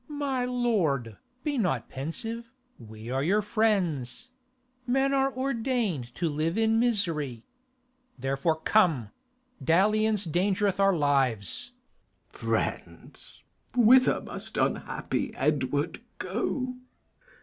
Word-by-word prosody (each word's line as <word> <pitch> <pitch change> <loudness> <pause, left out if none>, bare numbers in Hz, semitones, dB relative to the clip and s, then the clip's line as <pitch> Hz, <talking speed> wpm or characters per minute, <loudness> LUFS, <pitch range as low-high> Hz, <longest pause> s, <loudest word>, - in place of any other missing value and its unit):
_ - - -41
My 280 -4 -1
lord, 180 - 0 0.3
be 290 -4 -1
not 170 - 0
pensive; 225 - -5 0.3
we 110 0 -9
are 135 +1 0
your 200 +8 +2
friends: 200 - 0 0.6
Men 270 +2 +2
are 270 0 +2
ordain'd 235 - -1
to 170 - -1
live 160 +4 -1
in 225 0 +3
misery; 165 - 0 0.7
Therefore, 135 +5 0
come; 160 - +3 0.5
dalliance 210 +4 +3
dangereth 190 +4 +1
our 195 -2 +4
lives. 140 - 0 0.6
K. - - -15
Edw. - - -7
Friends, - - -4 0.3
whither 250 +2 +6
must - - -8
unhappy - - -1
Edward - - 0 0.2
go? 255 -1 -2
200 Hz, 105 wpm, -28 LUFS, -, 0.7 s, whither